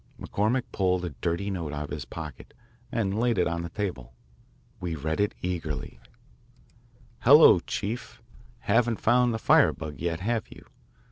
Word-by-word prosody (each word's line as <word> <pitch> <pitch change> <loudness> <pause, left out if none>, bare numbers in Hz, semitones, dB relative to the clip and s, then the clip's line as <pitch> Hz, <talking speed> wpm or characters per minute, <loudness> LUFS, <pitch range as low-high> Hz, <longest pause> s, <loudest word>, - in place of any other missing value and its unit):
McCormick 115 +5 0
pulled 90 -2 0
a - - -3
dirty 85 +9 -2
note 85 -6 -4
out 75 0 -3
of 70 - -8
his - - -5
pocket 75 -6 -9 0.4
and 105 -3 -1
laid 120 -2 +1
it 90 - +3
on 85 0 -2
the 85 - -5
table. 85 - -5 0.6
We 85 -2 -3
read 80 +3 -3
it 105 0 +1
eagerly: 80 -9 -4 1.2
Hello, 140 - +8
Chief! 115 +6 -5 0.4
Haven't 115 +1 +2
found 125 +1 +3
the 110 - -1
firebug 80 - +2
yet, 85 0 -2
have 115 +3 -1
you? - - -14
90 Hz, 150 wpm, -27 LUFS, 80-110 Hz, 1.2 s, Hello